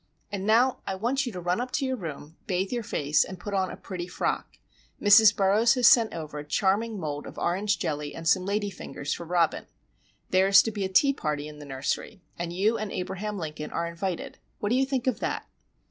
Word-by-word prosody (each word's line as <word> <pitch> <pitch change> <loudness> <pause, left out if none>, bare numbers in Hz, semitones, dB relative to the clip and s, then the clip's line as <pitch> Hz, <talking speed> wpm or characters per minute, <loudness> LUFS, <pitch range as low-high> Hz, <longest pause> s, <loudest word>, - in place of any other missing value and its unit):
"And 200 0 -3
now 240 +4 +4
I 190 - -1
want 250 +7 0
you - - -3
to 185 - -6
run 180 +5 0
up 255 - -3
to 275 - 0
your 260 0 -1
room, 160 - -7
bathe 190 +1 -1
your 245 -1 -1
face, 150 -8 +1
and 185 -1 -8
put 205 +3 -6
on 190 -1 +1
a - - -8
pretty 180 -2 -6
frock. 180 - -3 0.4
Mrs. 210 +1 +7
Burroughs 210 +5 +4
has 250 -2 +2
sent 230 -2 +7
over 155 -2 -6
a - - -6
charming 200 +7 0
mould 150 -3 -4
of - - -11
orange 200 +4 0
jelly 150 -4 -3
and 165 0 -6
some 185 +1 +4
lady 205 +1 -1
fingers 145 -5 -5
for 170 - -7
Robin. 170 -2 +1 0.6
There 185 +1 +4
is 195 0 +7
to 225 - -2
be 205 -2 -3
a 190 - -1
tea 275 +9 +4
party 150 - -3
in 150 -1 -11
the 145 - -9
nursery, 140 +8 -3
and 170 0 -4
you 205 +6 +1
and 215 -1 -4
Abraham 190 +3 -4
Lincoln 155 -3 -5
are 170 - -2
invited. 170 +1 -4 0.2
What 205 - -2
do 240 - +2
you 265 +1 +2
think 265 -3 -1
of 250 -4 0
that?" - - -2
190 Hz, 225 wpm, -27 LUFS, 170-215 Hz, 0.6 s, Mrs